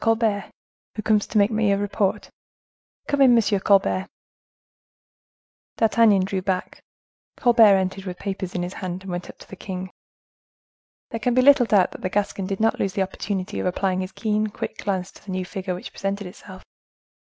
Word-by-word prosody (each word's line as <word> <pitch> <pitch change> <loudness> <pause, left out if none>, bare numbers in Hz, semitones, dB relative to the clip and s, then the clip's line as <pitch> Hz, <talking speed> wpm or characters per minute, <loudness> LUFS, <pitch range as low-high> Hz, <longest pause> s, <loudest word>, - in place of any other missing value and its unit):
Colbert, 225 -3 +1 0.5
who 215 - -4
comes 215 -1 +2
to 215 - -2
make 205 +2 +4
me 215 -2 +2
a 200 - +2
report. 205 0 -1 0.8
Come 285 -1 0
in, 250 -3 +7
M. 210 -3 +2
Colbert." 195 -1 +2 1.7
D'Artagnan 220 -4 +4
drew 190 -1 -2
back. 185 -1 -3 0.6
Colbert 230 -5 +6
entered 190 0 -2
with 180 -2 -5
papers 190 -2 -5
in 175 - -1
his 180 +1 -5
hand, 185 -2 -5
and 190 - -7
went 175 0 -5
up - - -11
to - - -15
the - - -10
king. 185 0 -6 1.2
There 230 - -3
can 245 +1 0
be 255 - +4
little 280 -3 +6
doubt 200 -5 +3
that - - -10
the 185 - -2
Gascon 195 -1 -1
did 195 -1 -3
not 225 0 +1
lose 195 - -1
the 195 -1 +1
opportunity 190 0 -4
of - - -1
applying 185 0 0
his 185 - -5
keen, 215 -1 -1
quick 210 - -6
glance 190 -2 -2
to - - -18
the - - -14
new 185 0 -2
figure 185 -1 -4
which 180 - -9
presented 195 +1 -3
itself. 185 +1 -11
195 Hz, 190 wpm, -23 LUFS, 185-215 Hz, 1.7 s, in